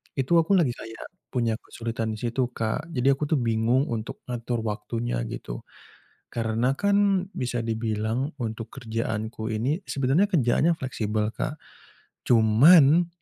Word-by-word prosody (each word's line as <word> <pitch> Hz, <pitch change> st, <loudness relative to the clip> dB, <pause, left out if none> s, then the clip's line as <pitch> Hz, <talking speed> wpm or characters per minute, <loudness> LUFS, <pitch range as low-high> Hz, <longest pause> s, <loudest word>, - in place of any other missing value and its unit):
Itu 140 Hz, +5 st, +3 dB
aku 165 Hz, +5 st, +3 dB
lagi 165 Hz, -9 st, +3 dB
kayak 115 Hz, -1 st, -9 dB, 0.2 s
punya 115 Hz, -3 st, -1 dB
kesulitan 115 Hz, -2 st, -4 dB
di -, -, -9 dB
situ 120 Hz, +2 st, 0 dB
Kak, 115 Hz, +8 st, -2 dB
jadi 130 Hz, +2 st, +3 dB
aku 150 Hz, -, -1 dB
tuh 155 Hz, -, +2 dB
bingung 120 Hz, 0 st, +2 dB
untuk 115 Hz, -1 st, -5 dB
ngatur 120 Hz, -1 st, -3 dB
waktunya 110 Hz, -, -3 dB
gitu. -, -, -6 dB, 0.7 s
Karena 115 Hz, +3 st, 0 dB
kan 200 Hz, -1 st, +2 dB
bisa 120 Hz, -, -2 dB
dibilang 110 Hz, +3 st, -1 dB
untuk 115 Hz, -3 st, -4 dB
kerjaanku 110 Hz, -2 st, -3 dB
ini, 120 Hz, -, -1 dB
sebenarnya 140 Hz, +9 st, +2 dB
kerjaannya 160 Hz, -, +2 dB
fleksibel 110 Hz, -5 st, -2 dB
Kak, 145 Hz, +6 st, -3 dB, 0.7 s
cuman 140 Hz, +9 st, +6 dB
120 Hz, 130 wpm, -26 LUFS, 110-140 Hz, 0.7 s, cuman